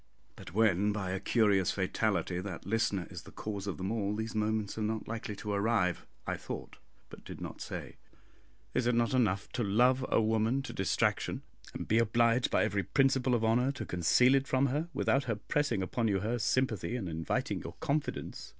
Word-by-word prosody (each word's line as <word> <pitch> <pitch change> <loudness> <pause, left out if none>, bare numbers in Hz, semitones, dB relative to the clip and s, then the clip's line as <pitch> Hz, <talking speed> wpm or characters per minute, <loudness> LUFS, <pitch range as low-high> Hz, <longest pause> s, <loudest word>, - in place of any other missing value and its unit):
"But - - -10
when, 105 -2 +3
by 100 -3 -3
a 95 - -2
curious 100 -5 +3
fatality, 95 -2 0
that 90 -3 -6
listener 100 -3 0
is - - -7
the - - -14
cause 100 -2 -5
of 95 -6 -3
them 95 +5 -3
all, 105 -2 -1
these 110 +1 -3
moments 110 -1 -1
are - - -2
not 110 +1 -2
likely 110 -2 -4
to 105 +1 -5
arrive," 100 -3 +1 0.2
I - - -2
thought, - - -7 0.3
but - - -12
did - - -9
not - - -7
say. - - -6 0.8
Is 120 - +1
it 120 - +3
not 120 +2 +2
enough 100 -6 +1
to 120 - -1
love 125 +6 +3
a - - +3
woman 110 +4 +1
to 145 - -6
distraction, 95 - 0 0.3
and - - -5
be 110 - +3
obliged 115 +2 +3
by - - +3
every 100 - 0
principle 135 +1 +2
of 115 -1 +1
honour 125 +4 +3
to 140 - -5
conceal 105 +9 +4
it 135 0 +2
from 130 +1 +2
her, 150 +5 -1
without 140 -1 +1
her 115 - 0
pressing 125 -1 0
upon 115 +5 -1
you 100 -3 +1
her 115 +4 -1
sympathy, 120 0 0
and 110 -7 -3
inviting 80 -1 -2
your - - -7
confidence? 145 +1 -3
110 Hz, 195 wpm, -31 LUFS, 100-125 Hz, 0.8 s, conceal